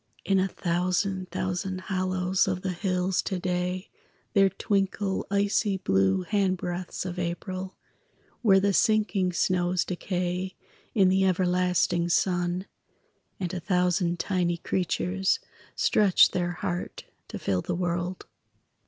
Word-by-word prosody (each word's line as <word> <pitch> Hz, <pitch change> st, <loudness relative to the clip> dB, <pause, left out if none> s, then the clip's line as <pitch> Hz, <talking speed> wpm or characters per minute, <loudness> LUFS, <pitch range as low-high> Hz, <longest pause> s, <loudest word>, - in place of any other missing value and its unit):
In 195 Hz, -1 st, +3 dB
a 190 Hz, -, +2 dB
thousand 185 Hz, +1 st, -1 dB
thousand 185 Hz, 0 st, -3 dB
hollows 185 Hz, -1 st, 0 dB
Of 185 Hz, -1 st, -2 dB
the 190 Hz, -, -1 dB
hills 185 Hz, 0 st, 0 dB
to 190 Hz, -, -3 dB
day 180 Hz, +1 st, -2 dB, 0.4 s
there 195 Hz, -1 st, +5 dB
twinkle 195 Hz, -1 st, -1 dB
Icy 200 Hz, 0 st, +1 dB
blue 95 Hz, -, +2 dB
handbreadths 185 Hz, -3 st, -1 dB
of 180 Hz, -1 st, -4 dB
April, 185 Hz, +2 st, -4 dB, 0.7 s
Where 195 Hz, -5 st, +5 dB
the 200 Hz, +1 st, +2 dB
sinking 210 Hz, -3 st, +2 dB
snows 180 Hz, 0 st, +1 dB
decay 180 Hz, 0 st, -3 dB, 0.4 s
In 195 Hz, -4 st, +5 dB
the 190 Hz, +1 st, +3 dB
everlasting 180 Hz, -1 st, +2 dB
sun; 175 Hz, +1 st, +1 dB, 0.7 s
And 180 Hz, -2 st, -3 dB
a 185 Hz, -, -2 dB
thousand 180 Hz, 0 st, +1 dB
tiny 175 Hz, -1 st, 0 dB
creatures 185 Hz, -, 0 dB, 0.4 s
Stretch 200 Hz, -4 st, +4 dB
their 175 Hz, -1 st, -1 dB
heart 175 Hz, -1 st, -4 dB, 0.2 s
to -, -, -6 dB
fill 95 Hz, -2 st, -1 dB
the 175 Hz, -, -3 dB
world. 175 Hz, +1 st, -2 dB
185 Hz, 120 wpm, -27 LUFS, 175-190 Hz, 0.7 s, there